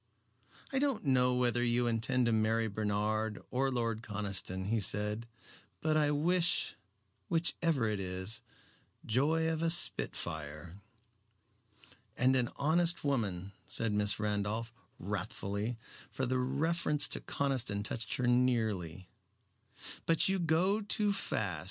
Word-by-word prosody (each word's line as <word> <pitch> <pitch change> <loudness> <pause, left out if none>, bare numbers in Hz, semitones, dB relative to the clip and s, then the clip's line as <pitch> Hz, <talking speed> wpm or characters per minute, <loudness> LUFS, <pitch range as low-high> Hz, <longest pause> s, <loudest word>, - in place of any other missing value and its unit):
"I 265 - +2
don't 275 - 0
know 125 -2 +3
whether 120 -1 +1
you 120 0 +1
intend 120 +2 +1
to 120 - +2
marry 110 +1 +1
Bernard 105 +1 -1
or 135 +2 +1
Lord 115 -3 -1
Conniston," 100 -3 -2
he 115 0 +1
said, 105 +3 -1 0.5
"but 155 0 0
I 150 -1 +3
wish, 175 +4 +1 0.5
which 165 0 +1
ever 155 -9 +1
it 105 -2 -1
is, 95 +2 -2 0.6
joy 155 +8 +1
of 160 -1 -1
a 165 - +2
spitfire." 80 - +1 1.4
"And 130 +1 +3
an 125 -2 +1
honest 170 +4 +2
woman," 100 -10 -1 0.2
said 115 -1 +1
Miss 105 +1 +1
Randolph, 105 +2 -2 0.2
wrathfully, 100 +3 -3 0.3
for 130 - -2
the 130 +1 0
reference 150 +4 +2
to - - 0
Conniston 125 -7 -1
touched 110 +2 -3
her 125 - -1
nearly; 110 -8 0 1.0
"but 165 -1 +5
you 195 0 +2
go 175 +6 +2
too 210 0 +1
fast. 100 - -2
120 Hz, 125 wpm, -32 LUFS, 105-150 Hz, 1.4 s, but